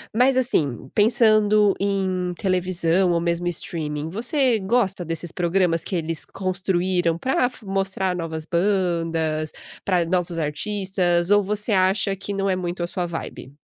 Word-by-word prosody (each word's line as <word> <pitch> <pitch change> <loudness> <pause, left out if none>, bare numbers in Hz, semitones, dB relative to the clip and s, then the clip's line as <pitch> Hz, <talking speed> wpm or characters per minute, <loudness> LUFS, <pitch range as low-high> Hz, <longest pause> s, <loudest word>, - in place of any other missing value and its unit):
mas 255 +3 +4
assim, 145 - 0
pensando 215 -2 +4
em 190 -2 -1
televisão 185 -2 +1
ou 170 - +2
mesmo 170 +1 -1
streaming, 155 -3 -3
você 245 - +1
gosta 195 -2 0
desses 165 0 -4
programas 175 -2 +1
que 190 - -4
eles 165 -1 -2
construíram 185 -2 -1
pra 260 +7 0
f 245 - -16
mostrar 195 -1 -1
novas 160 -2 -4
bandas, 165 -4 0 0.3
pra 180 -3 +1
novos 175 -1 -1
artistas, 180 +2 0
ou 205 0 +5
você 210 +2 -1
acha 195 +1 +2
que 195 +1 -5
não 195 0 -1
é 190 - +2
muito 180 -1 -4
a - - -1
sua 180 0 -2
vibe? 165 -4 -7
185 Hz, 145 wpm, -23 LUFS, 170-200 Hz, 0.3 s, ou